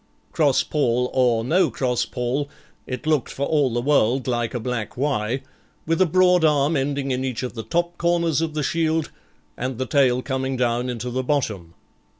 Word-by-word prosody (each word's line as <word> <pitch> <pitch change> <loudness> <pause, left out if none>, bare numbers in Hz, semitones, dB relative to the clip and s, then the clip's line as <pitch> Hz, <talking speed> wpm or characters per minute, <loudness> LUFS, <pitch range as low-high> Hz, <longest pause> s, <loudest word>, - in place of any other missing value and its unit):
Cross 145 -5 +3
pall_ 125 -4 0
or 120 -3 +2
no 170 +7 +3
cross 125 -2 -1
pall, 130 +3 -2 0.4
it 125 +1 -5
looked 155 -4 +1
for 140 - -3
all 145 -4 +2
the 120 +1 -1
world 130 -3 +2
like 120 -1 -1
a - - -1
black 115 -1 -4
'Y', 130 -2 -1 0.4
with 165 +2 +1
a 185 - +5
broad 180 +1 +4
arm 150 0 +3
ending 140 0 -1
in 130 0 -1
each 130 -2 -3
of 125 - -4
the 115 - -5
top 175 +6 -2
corners 170 -3 +1
of 160 -2 -2
the 150 - -1
shield, 160 +1 0 0.4
and 125 0 -4
the 130 - -2
tail 130 -2 +2
coming 130 -1 -2
down 120 0 0
into 120 0 -4
the 130 +2 -1
bottom. 110 - -2
130 Hz, 185 wpm, -23 LUFS, 125-150 Hz, 0.4 s, a